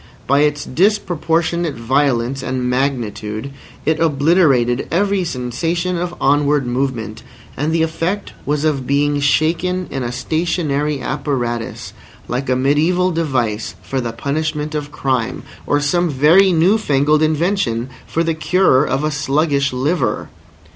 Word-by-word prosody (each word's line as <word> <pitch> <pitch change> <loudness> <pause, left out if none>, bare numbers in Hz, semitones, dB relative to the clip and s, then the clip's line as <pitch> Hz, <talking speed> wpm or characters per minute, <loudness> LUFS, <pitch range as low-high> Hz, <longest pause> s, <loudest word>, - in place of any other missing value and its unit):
By 140 +2 +3
its 150 0 +1
disproportionate 170 -2 0
violence 130 +1 0
and 130 -1 -2
magnitude 125 -3 -2 0.3
it 155 0 +1
obliterated 140 -5 +2
every 195 +2 +1
sensation 165 +6 -2
of 175 0 -3
onward 145 0 +2
movement; 120 -3 -2 0.3
and 150 +3 -1
the 165 0 +2
effect 165 +5 -2
was 150 +1 -1
of 140 -5 0
being 145 +1 +1
shaken 165 +6 +1
in 135 - -3
a 120 -1 -3
stationary 150 +1 -1
apparatus 125 -4 -3 0.3
like 130 +2 -3
a - - +3
mediæval 160 +8 +2
device 120 - -1
for 130 +8 -2
the 120 -1 -3
punishment 150 +5 -2
of 150 -1 -4
crime, 130 -6 -2 0.2
or 145 - +2
some 175 +4 +1
very 160 +8 +5
newfangled 155 -5 +3
invention 155 - 0 0.2
for 165 - 0
the 165 -1 0
cure 160 -3 +3
of 135 0 -1
a 155 - 0
sluggish 145 -1 +1
liver. 140 +7 -1
145 Hz, 130 wpm, -18 LUFS, 130-165 Hz, 0.3 s, very